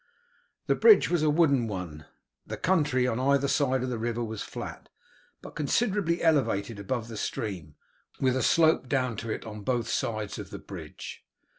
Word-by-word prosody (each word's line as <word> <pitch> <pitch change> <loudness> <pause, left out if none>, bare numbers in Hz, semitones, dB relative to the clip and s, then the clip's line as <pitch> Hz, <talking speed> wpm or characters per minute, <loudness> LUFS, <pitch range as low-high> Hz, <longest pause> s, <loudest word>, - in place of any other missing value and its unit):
The - - +3
bridge 440 - +6
was 175 -3 +2
a 155 - +3
wooden 145 -6 +3
one, 90 -7 -6 0.4
the - - -5
country 150 -8 +2
on 125 -1 0
either 140 +1 +2
side 130 -3 +1
of 130 - -2
the 120 - -3
river 120 +1 -2
was 110 -2 -5
flat, - - -7 0.5
but - - -10
considerably 185 +2 0
elevated 115 -10 +1
above 115 +3 -3
the 115 - -8
stream, 90 -10 -4 0.4
with 130 -1 +2
a 130 - 0
slope 160 0 +3
down 125 -4 0
to 115 - -5
it - - -4
on 105 -1 -7
both 120 +1 -1
sides 110 -3 -2
of - - -7
the - - -7
bridge. - - -9
125 Hz, 175 wpm, -28 LUFS, 110-150 Hz, 0.5 s, bridge